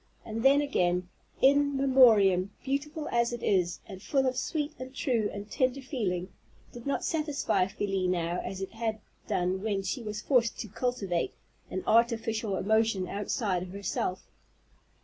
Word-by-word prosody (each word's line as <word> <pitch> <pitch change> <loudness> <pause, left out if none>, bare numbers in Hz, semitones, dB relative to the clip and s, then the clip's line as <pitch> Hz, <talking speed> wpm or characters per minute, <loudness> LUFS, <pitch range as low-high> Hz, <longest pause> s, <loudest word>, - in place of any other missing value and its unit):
And 225 0 -4
then, 275 +3 +5
again, 180 -9 0 0.3
"In 285 +1 +4
Memoriam," 220 -9 +5
beautiful 295 +3 -2
as 235 0 +1
it 240 -1 -5
is, 180 -3 +1
and 190 -2 -10
full 270 +4 +1
of 255 0 +1
sweet 300 +3 -2
and 260 +1 -8
true 235 -8 0
and 205 0 -7
tender 255 0 +1
feeling, 205 - -2 0.4
did 240 +2 -9
not 280 - -1
satisfy 300 - 0
Felie 195 -1 -1
now 175 -1 0
as 195 0 -5
it 190 - -6
had 225 -1 -3 0.3
done 185 +1 0
when 200 -2 -1
she 195 +7 -3
was 210 -2 -5
forced 235 -2 +2
to 220 - -7
cultivate 200 -6 -2 0.3
an 185 - -4
artificial 225 -2 +2
emotion 215 -1 +1
outside 200 -2 -1
of 180 0 -7
herself. 195 -2 -2
220 Hz, 155 wpm, -29 LUFS, 190-260 Hz, 0.4 s, then